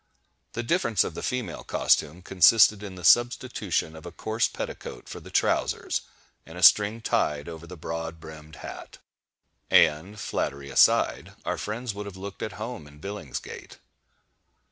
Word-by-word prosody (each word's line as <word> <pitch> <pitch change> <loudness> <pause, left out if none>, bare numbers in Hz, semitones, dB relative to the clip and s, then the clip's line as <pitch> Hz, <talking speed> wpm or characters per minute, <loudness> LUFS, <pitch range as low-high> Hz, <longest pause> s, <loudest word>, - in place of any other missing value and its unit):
The 120 - -3
difference 115 - +2
of - - -5
the - - -6
female 120 -9 -3
costume 85 +5 +1
consisted 100 +3 +5
in 100 -3 -8
the 90 - -10
substitution 115 -6 +2
of 80 - -11
a - - -8
coarse 110 +1 0
petticoat - - -7
for - - -8
the - - -13
trowsers, - - 0 0.4
and 80 +2 -12
a 90 - -4
string 105 +7 +6
tied 75 -8 0
over 85 0 -9
the 90 +1 -10
broad 80 +1 -5
brimmed 80 -1 -11
hat;—and, 80 +7 -2
flattery 70 -7 -3
aside, - - +3
our - - -2
friends 110 +2 -4
would 100 0 -6
have 95 -2 -9
looked 100 +1 -8
at 110 - -4
home 110 -7 -7
in 75 0 -16
Billingsgate. 100 +4 -7
95 Hz, 150 wpm, -26 LUFS, 80-110 Hz, 0.4 s, string